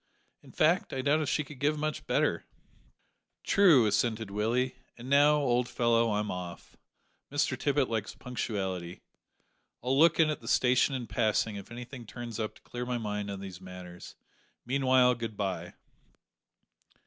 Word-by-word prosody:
"In - - -16
fact, 165 +4 +2
I 130 - -2
doubt 145 +3 +3
if 150 - -1
she 150 - +1
could 145 -2 -12
give 150 +2 +1 0.3
better." - - +1 1.0
"True," 165 - +5
assented 110 0 0
Willie, 120 +5 0 0.2
"and 120 +1 -9
now, 145 +1 +6
old 125 -3 +1
fellow, 115 -2 +2
I'm 105 0 -1
off. 90 -2 -7 0.6
Mr 145 -2 +1
Tippet 140 0 +1
likes 110 -2 -3
punctuality. 95 -8 -4 0.8
I'll 130 +2 +1
look 165 +4 +5
in 155 -1 +5
at 150 - -5
the - - -11
station 130 +2 +3
in 125 -2 -4
passing 110 -1 0
if 100 0 -8
anything 120 0 -9
turns 120 -1 -7
up 110 -1 -3
to - - -19
clear 125 0 -6
my 125 -1 -1
mind 105 -2 -3
on 100 -1 -5
these 95 -2 -8
matters; 90 -1 -10 0.5
meanwhile 130 -1 +4
good 115 -3 -6
bye." 90 -4 -3
120 Hz, 155 wpm, -30 LUFS, 105-135 Hz, 1.0 s, now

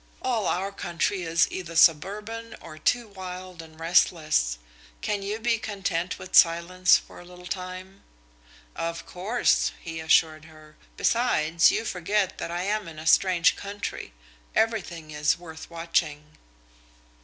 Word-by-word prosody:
All 230 -6 0
our 195 +2 -1
country 185 0 -2
is 165 0 +2
either 170 -3 -6
suburban 210 +9 +2
or 155 -2 -11
too 240 +8 +1
wild 185 -3 -8
and 160 -1 -15
restless. 160 - +2 0.4
Can 205 -1 -1
you 205 +2 -3
be 230 0 0
content 185 -5 -3
with 185 - -6
silence 175 +2 +5
for - - -13
a - - -11
little 180 0 -14
time?" 185 +1 -7 0.7
"Of 165 0 -4
course," 210 +7 +1
he 165 -1 -7
assured 160 -1 +2
her. 155 -1 -16 0.2
"Besides, 170 -9 +3
you 225 - -1
forget 190 +1 -1
that - - -4
I 175 +1 -3
am 210 0 -1
in 160 -2 -10
a 155 - -8
strange 180 +1 +4
country. 200 - -6 0.4
Everything 175 -8 -1
is 150 +1 +1
worth 160 -2 -11
watching." 155 -3 -2
180 Hz, 140 wpm, -26 LUFS, 165-200 Hz, 0.7 s, silence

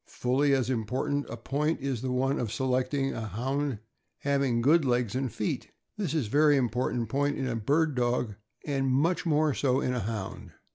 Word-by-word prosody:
Fully 135 +4 +1
as 130 -2 +1
important 130 +5 -1
a 115 - -5
point 145 +7 -1
is 135 -4 -2
the 130 0 -2
one 135 +3 +1
of 115 -4 -2
selecting 130 +3 0
a 110 -1 -4
Hound 135 +5 -2 0.4
having 140 -4 +1
good 155 +5 +5
legs 120 -4 +1
and 130 -2 -1
feet. 105 - -3 0.3
This 185 -8 -2
is 150 -6 +1
a - - -7
very 150 0 +5
important 120 -1 0
point 145 +4 0
in 135 - -2
a 120 - -1
bird 150 +8 +1
dog, 120 -3 0 0.3
and 135 -2 0
much 165 +7 +1
more 155 -1 +3
so 130 -1 +1
in 125 - 0
a 125 - -1
Hound. 110 -2 -5
130 Hz, 190 wpm, -28 LUFS, 120-145 Hz, 0.4 s, good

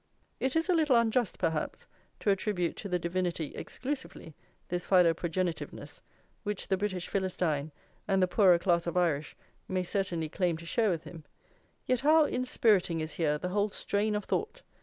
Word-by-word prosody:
It 265 +2 -1
is 325 +1 +2
a 365 - +3
little 310 -6 +3
unjust, 235 -1 +2
perhaps, 160 -3 -2 0.4
to 205 - +3
attribute 190 -3 -1
to 200 - -6
the 180 - +1
Divinity 170 -3 -2
exclusively 260 - -5 0.3
this 175 0 -2
philoprogenitiveness, 175 -1 0 0.4
which 210 -2 -4
the 190 - +3
British 190 -2 -3
Philistine, 170 -6 -1 0.4
and 195 -2 +2
the 185 - +4
poorer 180 -2 +5
class 170 -1 +1
of 170 - -1
Irish, 160 -4 0 0.3
may 185 -1 -1
certainly 175 -4 -1
claim 175 +1 0
to 170 - -11
share 220 +5 +2
with 165 -4 -1
him; 165 -3 -10 0.6
yet 255 -1 +1
how 310 +3 +5
inspiriting 220 - +2
is 155 0 -3
here 150 -3 +1
the 180 +4 -4
whole 205 +2 +1
strain 205 +2 -1
of 210 - -2
thought! 450 +4 -2
185 Hz, 165 wpm, -30 LUFS, 170-215 Hz, 0.6 s, poorer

